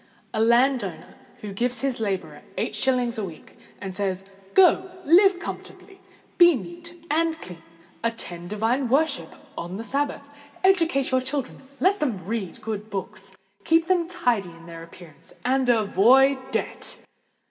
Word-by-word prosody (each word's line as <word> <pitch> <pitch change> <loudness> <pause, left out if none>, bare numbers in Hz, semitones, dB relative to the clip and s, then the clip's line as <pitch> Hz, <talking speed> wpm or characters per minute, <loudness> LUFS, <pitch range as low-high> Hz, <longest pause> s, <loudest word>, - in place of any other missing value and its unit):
A 220 - 0
landowner 245 +3 +2 0.4
gives 245 +5 -1
his 270 -3 -1
labourer 200 -4 -3 0.2
eight - - -2
shillings 250 -3 0
a - - -2
week, 170 -5 -9 0.2
and 190 -1 -6
says, 190 -1 -2 0.3
"Go 370 0 +5
and 330 +1 +5
live 390 0 +6
comfortably—be 355 -1 0
neat 340 - -9
and 320 +1 +1
clean—attend 175 - -7
divine 230 +5 0
worship 280 +1 +1 0.2
on 175 +3 -5
the 225 - -5
Sabbath—educate 285 - 0
your 260 0 +3
children—let 280 +7 -2
them 225 - -2
read 210 -3 -4
good 215 -1 -5
books—keep 195 - -2
them 350 -2 +1
tidy 245 - 0
in 165 0 -15
their 165 -1 -9
appearance—and 185 - -4
avoid 250 +5 +4
debt!" - - -4
250 Hz, 125 wpm, -24 LUFS, 195-300 Hz, 0.4 s, live